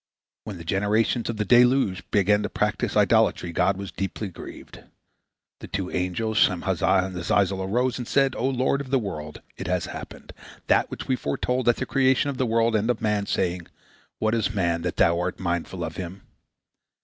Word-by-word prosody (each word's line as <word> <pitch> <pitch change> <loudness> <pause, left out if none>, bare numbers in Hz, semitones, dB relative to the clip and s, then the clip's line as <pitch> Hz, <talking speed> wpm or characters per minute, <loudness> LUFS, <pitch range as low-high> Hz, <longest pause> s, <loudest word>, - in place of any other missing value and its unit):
When 100 -4 -6
the 85 - -9
generation 105 +7 +1
of 115 - -3
the 105 - -1
deluge 120 -4 +4
began 105 +1 +3
to - - -3
practice - - -1
idolatry, 85 - +3
God 90 +3 +1
was 100 -1 -6
deeply 95 +1 -4
grieved. 85 - -11 0.8
The - - -9
two 95 -2 -3
angels 105 +5 -1
Shemhazai 95 - +2
and 95 -1 -7
Azazel 95 +2 +1
arose, 120 +6 0
and 120 - -5
said: 135 -2 +2
"O 130 - 0
Lord 130 +1 +1
of 135 - -8
the 135 - +3
world! 75 -10 -5 0.2
It - - -5
has 90 -1 0
happened, - - -9 0.3
that - - +2
which - - -7
we 130 - +2
foretold 125 - -1
at 120 - +4
the - - -3
creation 135 +1 +2
of 130 - -8
the 130 - +1
world 115 0 +2
and 110 +2 +1
of 125 - +1
man, 105 -2 0
saying, 85 -1 -1 0.5
'What 110 0 0
is 110 -2 0
man, 85 -3 0
that 90 0 -3
Thou 85 0 +3
art 90 +1 -3
mindful 85 0 -2
of 80 0 -5
him?'" 95 +1 -7
100 Hz, 190 wpm, -25 LUFS, 90-120 Hz, 0.8 s, deluge